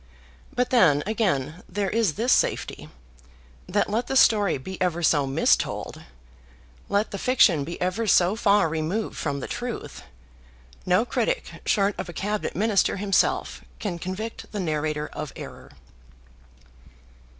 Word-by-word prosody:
But 250 0 0
then, 160 - +4
again, 180 - -1
there 200 -2 -2
is 220 -8 +1
this 235 +4 +1
safety, - - -1 0.8
that 205 +3 +1
let 225 +4 -1
the 270 - -2
story 205 - +4
be 185 +9 -8
ever 175 -2 0
so 145 -3 +3
mistold, 135 - 0 0.9
let 205 +2 +1
the 200 - -5
fiction 190 - +4
be 170 +4 -6
ever 185 +5 -1
so 180 +1 +4
far 205 -5 +3
removed 165 +7 -2
from 140 -2 -3
the - - -5
truth, 245 -1 -5 0.9
no 185 +6 +3
critic - - -2
short 200 -1 +2
of 185 - -4
a - - -7
Cabinet 205 +3 -3
Minister 205 -1 +2
himself 195 -1 0
can 180 -5 -4
convict 185 +6 -6
the 210 - -4
narrator 155 -3 -1
of 150 -2 -6
error. - - -10
190 Hz, 140 wpm, -25 LUFS, 165-215 Hz, 0.9 s, then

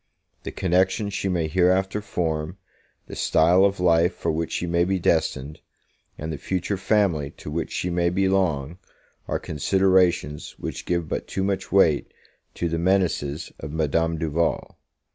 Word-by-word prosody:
The - - -6
connections 95 +3 +1
she 95 - -1
may 85 -3 0
hereafter 95 +4 +2
form, 80 -3 -3 0.5
the - - -9
style 90 +4 +4
of 100 -1 +2
life 85 0 +3
for 85 - -1
which 80 +1 -3
she - - -1
may 85 0 +2
be 95 +2 0
destined, 80 -4 0 0.6
and 80 +1 -5
the 75 - -6
future 95 +5 -2
family 95 -7 +1
to 75 - -8
which 80 +2 -3
she 90 - -2
may 85 0 +1
belong, 90 -4 0 0.5
are - - -1
considerations 90 -1 +1
which - - -6
give 85 -2 0
but - - -4
too 95 - -2
much 95 0 -2
weight 85 -7 +3 0.4
to 85 - -1
the 85 0 -2
menaces 85 -4 0
of 70 - -7
Madame 80 +1 0
Duval. 80 0 -1
85 Hz, 155 wpm, -24 LUFS, 80-95 Hz, 0.6 s, style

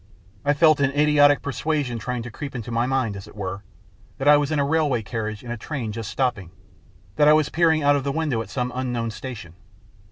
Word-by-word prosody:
I 145 +1 +2
felt 155 0 +5
an 140 -2 +3
idiotic 145 -1 +5
persuasion 140 -3 -2
trying 125 +1 -4
to 120 - -8
creep 140 +4 -7
into 120 -1 -5
my 115 +1 0
mind, 130 -6 0
as 95 - -9
it - - -15
were, 100 -1 -5 0.6
that 135 - -2
I 150 - +8
was 145 0 +1
in 155 - 0
a 140 - +2
railway 145 -6 +1
carriage 110 -1 -4
in 120 - -7
a 120 - -4
train 120 -2 -4
just 110 0 -5
stopping, 120 -10 -1 0.7
that 150 -1 +5
I 150 - +8
was 155 -1 +3
peering 160 -2 +2
out 145 0 +5
of 140 - -1
the 140 - -1
window 145 -6 -1
at 105 - -8
some 125 +2 -2
unknown 120 -3 -2
station. 110 -8 -8
130 Hz, 225 wpm, -23 LUFS, 115-145 Hz, 0.7 s, I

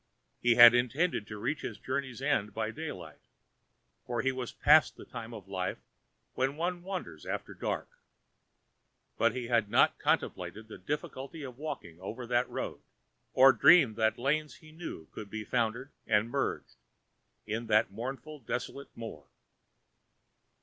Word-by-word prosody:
He 120 -1 +4
had 120 0 +11
intended 125 +1 +1
to 105 - -7
reach 145 +9 -2
his - - -5
journey's 130 -1 -4
end 105 -8 0
by 110 0 -1
daylight, 95 - -7 0.8
for 120 -2 -2
he 135 - +2
was 130 -2 -5
past 150 -1 +5
the - - -11
time 115 -1 -8
of 105 -5 -9
life 95 -1 -3 0.6
when 135 +2 0
one 175 +2 -2
wanders 185 0 -6
after - - -4
dark, - - -3 1.3
but - - +3
he 125 -1 -3
had 115 -3 +1
not - - +4
contemplated 110 +1 -1
the 110 - -10
difficulty 145 +1 -5
of 130 -1 -9
walking 140 - -6
over 110 +6 -6
that 120 +1 +1
road, - - -5 0.5
or 130 +1 +8
dreamed 145 -10 +6
that 110 0 +2
lanes 150 +4 0
he 155 -2 -16
knew 160 - -7
could 105 - -8
be 110 +1 -5
so - - -27
foundered 120 +3 0 0.2
and 110 +1 +2
merged, 135 - -2 0.7
in 115 +2 -3
that 105 -2 +3
mournful 135 +8 -6
desolate 135 +3 -5
moor. 80 -12 -8
120 Hz, 150 wpm, -31 LUFS, 110-140 Hz, 1.3 s, had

